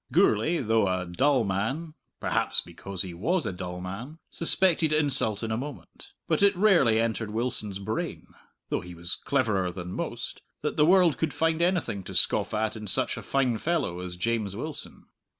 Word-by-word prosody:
Gourlay, 170 +1 +3
though 110 -3 +2
a 95 -1 -1
dull 130 +9 +2
man 115 - -2 0.3
perhaps - - +1
because 90 +2 -5
he 90 -2 -7
was 160 - 0
a - - -2
dull 90 0 -6
man 105 - -7
suspected 165 -2 +2
insult 140 -8 +2
in 110 - -2
a 110 - 0
moment. 140 +2 -8
But - - +1
it 200 0 +5
rarely 175 - +5
entered 115 -1 -1
Wilson's 110 -3 -1
brain 100 - -4 0.4
(though - - 0
he 90 0 -10
was 85 +1 -1
cleverer 110 -10 0
than 90 0 -7
most) - - -4 0.2
that - - -1
the 150 0 +4
world 180 -4 +5
could 155 -4 -1
find 165 +2 +1
anything 170 - +1
to - - -7
scoff - - +3
at 110 0 -1
in 110 -1 -7
such 95 - 0
a - - -6
fine 130 -5 0
fellow 155 - -1
as 90 -1 -5
James 105 +1 -1
Wilson. 150 +7 -7
115 Hz, 180 wpm, -27 LUFS, 95-155 Hz, 0.4 s, it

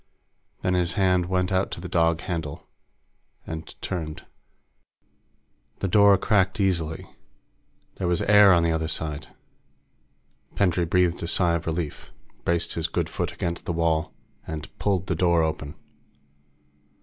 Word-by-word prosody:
Then 90 - +1
his 90 -1 +1
hand 90 -3 +2
went 90 +1 0
out 95 +1 +1
to - - -6
the 90 - -6
dog 85 -1 +2
handle 80 -5 -5 0.8
and 80 -1 -8
turned. 80 -4 -4 1.5
The 95 - -2
door 100 0 +6
cracked 95 0 +1
easily. 85 -5 0 0.9
There 90 - -2
was 85 -1 +1
air 105 -1 +7
on 85 -2 +4
the 85 - +2
other 80 0 -1
side. 75 -1 -4 1.3
Pendray 90 -3 +2
breathed 90 0 +1
a 85 - -3
sigh 85 0 +2
of 85 -1 -2
relief, 80 -2 -4 0.3
braced 85 0 0
his 80 -1 -1
good 80 - -2
foot - - -3
against 85 0 -4
the 85 - -2
wall, 80 -1 0 0.4
and 80 -2 -7
pulled 95 -3 0
the 95 - -1
door 85 -1 +3
open. 80 -2 -3
85 Hz, 140 wpm, -25 LUFS, 80-95 Hz, 1.5 s, air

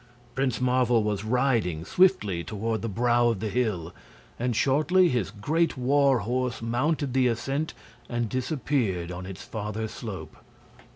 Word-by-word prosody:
Prince 130 -2 0
Marvel 125 -2 +3
was 105 -1 -1
riding 110 - +1
swiftly 105 - +2
toward 110 +2 -3
the 115 - -3
brow 120 +3 +2
of 115 -4 0
the 110 +1 -2
hill, 100 -8 -1 0.5
and 120 0 0
shortly 155 - +3
his 120 - 0
great 155 +10 0
war 135 -1 +3
horse 125 +3 -1
mounted 130 +4 -1
the 130 -1 +3
ascent 135 +6 -2 0.3
and 120 -1 -1
disappeared 125 - -1
on 90 +1 -6
its 95 -1 -8
farther 110 0 -4
slope. 110 -3 -8
120 Hz, 140 wpm, -27 LUFS, 105-130 Hz, 0.5 s, Marvel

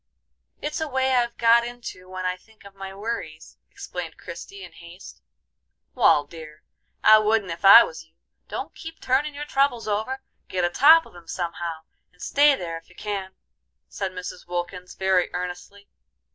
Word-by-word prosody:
It's 300 +2 -3
a 315 - -1
way 265 -1 0
I've 240 -2 +1
got 235 0 +5
into 235 -6 -8
when 185 0 -5
I 180 0 0
think 215 +3 -23
of 200 - -13
my 195 -1 -8
worries," 220 +4 -6
explained - - -7
Christie, 395 0 -9
in - - -11
haste. 170 - -13 0.7
"Wal, 145 - +4
dear, 155 0 -12 0.4
I 215 0 +8
wouldn't 215 -3 +1
ef 165 0 -7
I 195 - +10
was - - -8
you. - - -34 0.3
Don't - - -6
keep 325 0 -10
turnin' 285 +3 0
your 295 +1 -5
troubles 275 -5 +1
over. 220 +6 -2 0.2
Git 180 -1 -1
atop 300 - +6
of - - -17
'em 170 -1 -14
somehow, 170 -2 -4 0.3
and 180 - -30
stay 290 0 +4
there 170 -7 -5
ef 165 - -16
you 180 - -20
can," 195 -2 -5 0.5
said 195 -3 -4
Mrs. 180 -1 -8
Wilkins, 180 +1 -5
very 190 -1 +1
earnestly. 180 +3 -7
200 Hz, 170 wpm, -24 LUFS, 180-250 Hz, 0.7 s, I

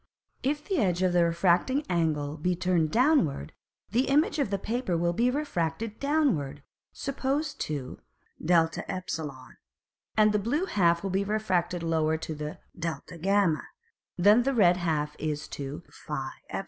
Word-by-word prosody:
If 295 +3 -1
the 380 -5 0
Edge 185 -5 +1
of 185 -1 +2
the 175 -1 +4
refracting 180 - +2
Angle 155 -4 0
be 180 +4 0
turned 175 -3 +1
downward, 235 - +2 0.4
the 245 +5 +2
Image 310 +6 +2
of 275 - +1
the 200 - 0
Paper 220 -3 -1
will 170 +1 +1
be 235 +7 +2
refracted 220 - -2
downward; 235 - 0 0.3
suppose 275 +2 -2
to 145 - -5 0.4
[Greek: - - -5
de], 170 +1 +1 1.1
and 215 0 +5
the 210 - +2
blue 280 - 0
half 170 - +2
will 195 - -2
be 195 +2 +1
refracted 185 -4 0
lower 160 -1 +1
to 160 - -5
[Greek: 150 0 -6 0.2
dg] 170 +2 0 0.6
than 205 +6 +6
the 270 +2 0
red 180 -5 +5
half 155 -4 -1
is 150 -1 -3
to 140 +3 -6 0.2
[Greek: 150 -2 -2 0.3
pe]. - - -3
180 Hz, 150 wpm, -28 LUFS, 160-240 Hz, 1.1 s, than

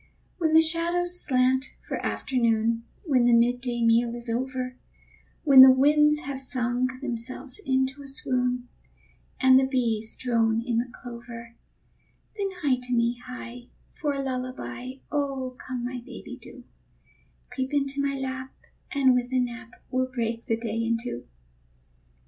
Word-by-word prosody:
When 320 -2 +2
the 320 - +8
shadows 345 +2 +1
slant 260 0 +1
for - - -4
afternoon, 230 -2 0 0.2
When 265 -9 +3
the 240 -1 +5
midday 240 0 +1
meal 230 +1 +3
is 235 -1 -3
over, 255 +1 -3 0.7
When 275 -4 +9
the 260 - +11
winds 300 +3 +4
have 270 -1 -4
sung 250 -1 0 0.2
themselves 255 - -3
into 265 +1 0
a 280 - -10
swoon, 250 -2 -1 0.7
And 260 0 +7
the 265 - +2
bees 230 -4 0
drone 230 -2 +1
in 235 -2 +1
the 240 +1 -3
clover, 235 -1 -10 0.8
Then 400 -2 -1
hie 260 -3 +2
to 250 0 -2
me, 235 +1 +1
hie, 245 -1 -9 0.2
for 295 -2 -2
a 275 0 -3
lullaby 255 -1 -5 0.2
Come, 260 -3 -3
my 250 0 -4
baby, - - -9
do; - - -12 0.9
Creep 260 -1 -3
into 280 -1 0
my 280 0 0
lap, 260 0 -5 0.4
and 270 -3 +4
with 250 0 0
a 260 - +1
nap 245 -1 -4 0.2
We'll 255 0 +1
break 230 -2 -3
the 225 - +1
day 225 -1 -4
in 230 0 +1
two. 230 - -6
255 Hz, 145 wpm, -26 LUFS, 240-270 Hz, 0.9 s, the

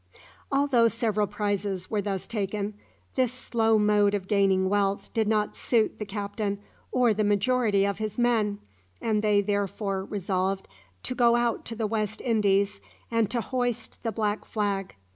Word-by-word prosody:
Although 275 -4 +4
several 220 -3 0
prizes 200 -2 -2
were 210 -2 +1
thus 195 -2 -3
taken, 205 -1 -2 0.4
this 255 -3 +2
slow 225 -3 +1
mode 210 -1 +3
of 190 -2 -4
gaining 195 -2 +3
wealth 200 0 0
did 220 -2 +1
not 210 -1 +1
suit 225 -3 +1
the 210 - -4
captain 200 0 -3 0.3
or 245 -3 +3
the 215 +1 0
majority 205 0 +2
of 200 0 -2
his 215 -1 -3
men, 225 -4 +2 0.4
and 215 -2 +1
they 210 -1 +3
therefore 200 -1 -1
resolved 190 -1 -2 0.4
to - - -3
go 235 -1 +4
out 240 -1 0
to 230 - -4
the 225 -1 -1
West 215 -1 -2
Indies 200 - +1 0.3
and 230 -3 +2
to 235 +1 -1
hoist 245 0 -3
the 225 - -2
black 210 0 -1
flag. 200 -3 -2
210 Hz, 160 wpm, -27 LUFS, 200-230 Hz, 0.4 s, Although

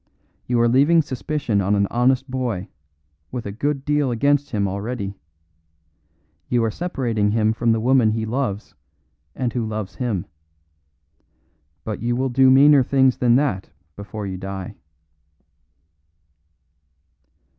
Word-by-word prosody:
You 120 -1 +1
are 120 - +4
leaving 145 +7 +4
suspicion 135 -5 -2
on 100 +2 +1
an 100 0 +2
honest 130 +3 +2
boy 120 -7 -3 0.6
with 125 - -5
a 100 - -4
good 135 +5 -2
deal 150 -2 +1
against 140 +4 +1
him 100 -3 -1
already; 100 +1 -4 1.4
you 120 -2 +2
are 110 - 0
separating 120 -10 -1
him 110 -1 +2
from 115 +1 +1
the 115 - +1
woman 125 -1 +3
he 110 0 -1
loves 110 -3 -3 0.6
and 125 -2 -2
who 120 - -1
loves 110 -3 -5
him. 115 -8 -2 1.6
But 105 -2 -5
you 120 +1 0
will 130 +1 0
do 130 +1 +4
meaner 140 +2 +6
things 130 0 +2
than 120 -1 +3
that 130 -9 0 0.3
before 105 +1 -7
you 95 -1 -5
die." 95 -1 -6
120 Hz, 135 wpm, -21 LUFS, 105-130 Hz, 1.6 s, meaner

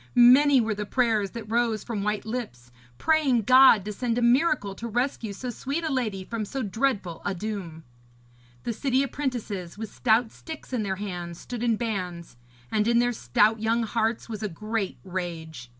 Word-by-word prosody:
Many 260 +3 +7
were 225 -2 +1
the 210 0 -5
prayers 225 -6 +1
that 230 +2 -7
rose 230 -1 0
from 220 -4 -3
white 210 +1 -1
lips, 220 - -6 0.3
praying 290 -8 +2
God 255 -4 +7
to 210 - -4
send 235 +2 -1
a - - +1
miracle 245 -4 +3
to 230 +4 -6
rescue 240 -1 -1
so 245 +5 -5
sweet 275 +8 -3
a 315 -3 -1
lady 215 -7 -1
from 225 +2 -4
so 260 +5 -4
dreadful 205 -5 -1
a 200 - -2
doom. 180 -5 -5 0.8
The 235 - -2
city 265 +3 +1
apprentices, 235 -10 -4
with 220 -1 -6
stout 225 -1 +2
sticks 315 -4 -10
in 245 - 0
their 195 -2 -1
hands, 175 -4 -6
stood 245 -2 -6
in 235 -2 +2
bands, 185 - -4 0.4
and 215 0 +1
in 235 0 +3
their 245 0 +3
stout 210 - +2
young 225 +2 +1
hearts 225 +1 -1
was 220 -2 -6
a 210 - -2
great 215 +3 -3
rage. 165 -8 -6
220 Hz, 180 wpm, -26 LUFS, 200-245 Hz, 0.8 s, Many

